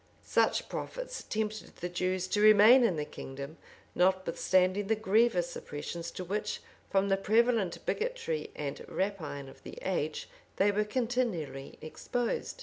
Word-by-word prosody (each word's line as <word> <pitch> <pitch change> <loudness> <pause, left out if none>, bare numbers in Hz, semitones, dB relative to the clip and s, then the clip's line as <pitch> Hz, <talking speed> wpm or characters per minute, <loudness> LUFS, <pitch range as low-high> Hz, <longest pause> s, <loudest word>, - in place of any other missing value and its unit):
[] - - -33
Such - - +2
profits - - -5
tempted 215 0 -4
the 175 - -4
Jews 185 +1 -1
to 205 - +1
remain 215 +4 +8
in 195 -7 +3
the 150 -1 -2
kingdom, 140 +3 -8 0.4
notwithstanding 185 +1 +2
the 220 - +3
grievous 210 -4 +2
oppressions 170 +3 -5
to 185 - -5
which, 210 +4 -2 0.3
from 195 +1 +2
the 195 - +3
prevalent 220 -2 +2
bigotry 440 - -2
and 140 -2 -4
rapine 165 -8 -3
of 135 - -14
the - - -10
age, 155 -5 -2 0.3
they 205 +1 +3
were 210 +1 +1
continually 210 - -2
exposed. 240 - -3
195 Hz, 145 wpm, -31 LUFS, 170-220 Hz, 0.4 s, remain